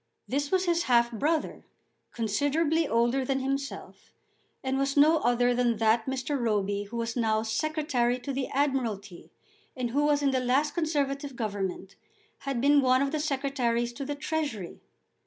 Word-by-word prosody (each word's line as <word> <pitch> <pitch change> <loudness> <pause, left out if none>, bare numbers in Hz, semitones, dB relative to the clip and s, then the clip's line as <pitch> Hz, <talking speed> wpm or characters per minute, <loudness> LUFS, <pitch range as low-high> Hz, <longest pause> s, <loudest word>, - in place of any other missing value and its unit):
This 285 +2 -1
was 375 0 +1
his 340 -1 +1
half 235 -1 +3
brother, 300 +7 -1 0.5
considerably 290 +8 0
older 240 +3 +1
than 270 +1 0
himself, 275 +1 -5 0.5
and 265 0 -1
was 275 +1 -1
no 310 +3 +6
other 245 0 +2
than 240 -2 +1
that 225 +2 +2
Mr. 265 +2 -2
Roby 205 -3 0
who 235 +4 -7
was 230 0 -3
now 220 -2 +1
Secretary 250 0 0
to 275 +2 -4
the 265 0 -2
Admiralty, 230 -10 -2 0.5
and 245 -2 -2
who 290 +3 +2
in 285 -1 +2
the 260 - +1
last 270 +4 +1
Conservative 285 -4 -1
Government 200 -5 -4 0.4
had 275 -3 -3
been 285 +3 +5
one 255 0 +3
of 275 - -1
the 310 - -1
Secretaries 265 -5 -1
to 275 - -6
the 290 +1 -4
Treasury. 285 - -4
265 Hz, 155 wpm, -28 LUFS, 235-285 Hz, 0.5 s, no